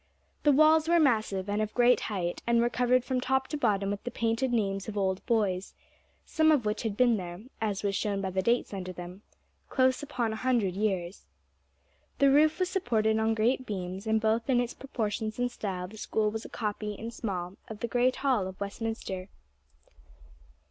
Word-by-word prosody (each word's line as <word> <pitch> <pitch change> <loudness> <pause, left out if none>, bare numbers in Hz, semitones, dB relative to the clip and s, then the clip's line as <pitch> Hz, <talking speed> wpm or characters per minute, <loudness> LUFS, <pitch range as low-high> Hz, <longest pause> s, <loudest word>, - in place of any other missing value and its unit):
The 295 - +4
walls 310 +2 +5
were 340 0 +5
massive, 215 - +1
and 205 +1 0
of 215 0 -3
great 245 0 +5
height, 180 -4 -2
and 235 0 +4
were 240 +1 +2
covered 250 0 +2
from 255 -2 -1
top 265 +1 +1
to - - -3
bottom 200 -6 +1
with 205 - -4
the - - -3
painted 235 +2 0
names 195 -4 0
of 215 -1 -5
old 190 -1 0
boys, 200 -6 0 0.5
some 315 0 +3
of 280 -7 +2
which 210 0 -1
had 220 -3 -3
been 245 -3 +4
there, 175 +1 -7 0.2
as 210 -3 -1
was 200 -1 0
shown 200 0 -1
by 190 -1 -2
the 190 +1 0
dates 235 +2 +1
under 185 -2 -4
them, 180 +2 -9 0.5
close 260 -1 +2
upon 245 -6 -2
a - - -4
hundred 235 -7 +1
years. 190 -3 -2 0.9
The 275 -1 +5
roof 305 +2 +4
was 370 0 +1
supported 220 - +1
on 220 0 +1
great 245 +4 +1
beams, 190 0 -5
and 220 0 +3
both 225 +3 0
in 250 -2 +4
its 245 -1 -1
proportions 220 -4 -3
and 245 0 0
style 185 -6 -4
the 215 +4 -12
School 215 -1 0
was 220 +1 -5
a - - -8
copy 210 -1 -3
in 225 +3 -6
small 190 -5 -4
of 220 -1 -9
the 235 - -1
great 250 +2 +2
hall 255 -9 +1
of 190 0 -9
Westminster. 200 -2 -4
220 Hz, 195 wpm, -29 LUFS, 195-245 Hz, 0.9 s, walls